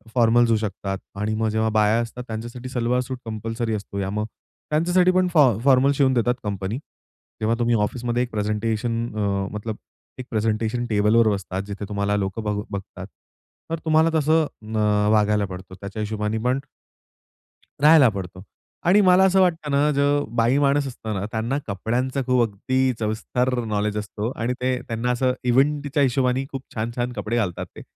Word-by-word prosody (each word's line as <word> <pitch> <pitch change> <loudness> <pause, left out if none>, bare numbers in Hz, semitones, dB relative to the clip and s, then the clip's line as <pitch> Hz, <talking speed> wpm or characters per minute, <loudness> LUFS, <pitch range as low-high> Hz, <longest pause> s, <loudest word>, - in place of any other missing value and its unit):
Formals 120 0 +4
येऊ 110 - +4
शकतात 100 -2 -3 0.2
आणि 105 +2 -2
मग 110 0 0
जेव्हा 110 +1 +1
बाया 110 +2 +4
असतात 120 +2 -6
त्यांच्यासाठी, 120 +3 -6
सलवार-सूट 125 +1 -1
कंपल्सरी 115 +1 -3
असतो, 100 -1 -6
या 95 0 -2
मग 105 +1 -2 0.5
त्यांच्यासाठी 180 +4 +3
पण 185 0 +2
फॉ 130 - +5
फॉर्मल 135 0 +5
शिवून 135 -2 +3
देतात 120 0 +2
कंपनी. 100 +2 -3 0.6
जेव्हा 115 +2 +2
तुम्ही 120 0 +2
ऑफिसमध्ये 120 +2 -1
एक 125 - -6
प्रेझेंटेशन 110 +2 -1
अ, 100 -1 0
मतलब 105 +1 -4 0.4
एक 125 - -5
प्रेझेंटेशन 110 +2 -1
टेबलवर 110 +1 +3
बसतात. 95 -1 -4
जिथे 100 0 -5
तुम्हाला 100 0 0
लोक 95 +2 -2
बघ 105 -2 -2
बघतात. 95 -1 -7 0.6
तर 165 - -1
तुम्हाला 160 +1 +4
तसं 155 +2 +3 0.3
अ, 105 -1 +2
वागायला 105 -1 +3
पडतो. 95 0 -9
त्याच्या 100 +2 -6
हिशोबाने 105 +1 -2
पण 130 +2 +2 1.2
राहायला 150 -4 +7
पडतो. 95 -2 -7 0.4
आणि 195 +4 +5
मला 185 -1 +5
असं 190 0 +4
वाटतं 165 -5 +1
ना, 145 +2 +3
जो 145 +1 +2
बाई 120 +3 +3
माणूस 140 0 +2
असतो 110 -4 -6
ना, 100 - -3
त्यांना 115 +5 -1
कपड्यांचा 125 +7 -1
खूप 125 -1 +3
अगदी 130 +6 0
सविस्तर 115 +4 -1
नॉलेज 105 -1 -1
असतो 105 +2 -3
आणि 120 +2 -1
ते 130 0 +1
त्यांना 115 +2 -1
असं 125 +1 +1
इव्हेंटच्या 140 +3 +2
हिशोबाने 130 0 +1
खूप 135 -1 -5
छान-छान 120 +2 -2
कपडे 120 -1 -3
घालतात 95 -6 -1
ते. - - -9
115 Hz, 165 wpm, -23 LUFS, 105-130 Hz, 1.2 s, राहायला